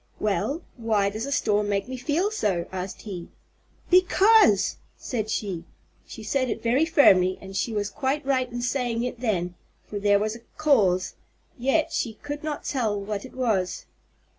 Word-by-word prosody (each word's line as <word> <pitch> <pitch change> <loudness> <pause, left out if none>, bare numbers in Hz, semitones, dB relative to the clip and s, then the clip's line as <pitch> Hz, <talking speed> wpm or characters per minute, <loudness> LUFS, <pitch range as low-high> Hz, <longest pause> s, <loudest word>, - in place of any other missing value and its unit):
"Well, 215 - -1
why 215 -4 +1
does 220 +5 -4
a - - -4
storm 210 -7 +1
make 200 +1 0
me 260 - -5
feel 305 - 0
so?" 195 - 0
asked 185 0 -5
he. 185 -5 -6 0.6
"Because!" 370 - +5 0.2
said 220 -4 -3
she. 195 -6 -2 0.4
She 220 - -9
said 255 +4 0
it - - -4
very 250 +7 +3
firmly 185 - +5
and 195 0 -10
she 230 - -1
was 205 -1 -2
quite 275 +2 -1
right 255 -2 +1
in 240 0 -4
saying 245 -2 -1
it 245 -1 -4
then, 185 -7 -1 0.3
for 205 - -5
there 205 0 +4
was 215 +2 -1
a - - -10 0.2
cause, 205 -12 +3 0.4
yet 295 +6 +1
she 235 -7 -1
could 290 +5 -7
not 305 -2 -4
tell 220 -7 -1
what 200 +1 -4
it 260 - -13
was. 215 -8 -1
230 Hz, 170 wpm, -25 LUFS, 200-275 Hz, 0.6 s, Because